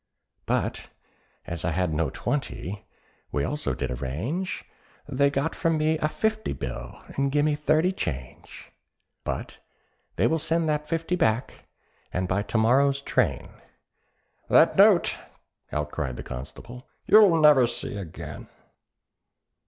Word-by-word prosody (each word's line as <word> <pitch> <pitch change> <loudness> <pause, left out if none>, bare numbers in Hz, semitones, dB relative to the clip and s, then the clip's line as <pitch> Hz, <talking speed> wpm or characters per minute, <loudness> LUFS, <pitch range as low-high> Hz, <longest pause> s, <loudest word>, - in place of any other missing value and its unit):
"But - - -1 0.6
as 85 -1 -5
I - - +1
had 85 0 0
no 80 +1 0
twenty, 100 +4 -4 0.4
we 70 - 0
also 150 - -2
did - - -3
arrange, 115 - -3 0.4
They 140 0 +2
got 140 +3 -1
from 165 -1 +1
me 155 +1 +1
a 155 - +1
fifty 220 +6 -1
bill, - - -7
and 140 0 +1
gimme 150 +1 +2
thirty 155 +4 +2
change; 65 - -6 0.5
But - - -5 0.6
they - - +2
will 160 - +2
send 165 +2 0
that 150 0 -1
fifty 165 +2 0
back, 125 -7 -1 0.4
and 90 +1 -1
by 95 +3 +1
to 105 +2 -2
morrow's 135 +5 +4
train——" 85 - 0 1.0
"That - - +5
note," - - +5 0.5
out 75 0 -2
cried 65 -5 -3
the - - -7
constable, 115 - -9 0.2
"you'll 205 -6 +7
never 150 -5 +6
see 120 -3 -4
again." 95 -6 -8
135 Hz, 130 wpm, -26 LUFS, -, 1.0 s, you'll